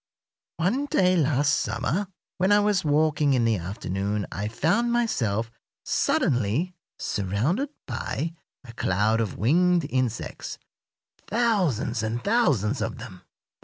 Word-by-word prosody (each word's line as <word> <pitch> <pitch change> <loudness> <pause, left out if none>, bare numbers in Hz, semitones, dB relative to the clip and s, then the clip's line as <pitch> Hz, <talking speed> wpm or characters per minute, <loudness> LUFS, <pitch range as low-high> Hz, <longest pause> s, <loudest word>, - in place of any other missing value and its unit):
One 235 - 0
day 185 -8 +3
last 145 -2 +2
summer, 195 +4 -1 0.3
when 190 +3 +3
I 205 - +6
was 205 -1 +2
walking 150 -2 +2
in 120 -2 +2
the 115 -2 +2
afternoon, 95 +3 -3
I 100 +2 -3
found 170 - +1
myself 115 - 0 0.3
suddenly 125 - +1 0.2
surrounded 115 - -1 0.2
by 145 +5 -3 0.3
a 120 -2 -11
cloud 110 +2 +1
of 110 - -3
winged 170 - +3
insects 125 -4 -2 0.7
thousands 190 - +1
and 115 +2 -3
thousands 140 - +2
of 110 +1 -3
them. 115 -6 -10
135 Hz, 120 wpm, -25 LUFS, 110-180 Hz, 0.7 s, I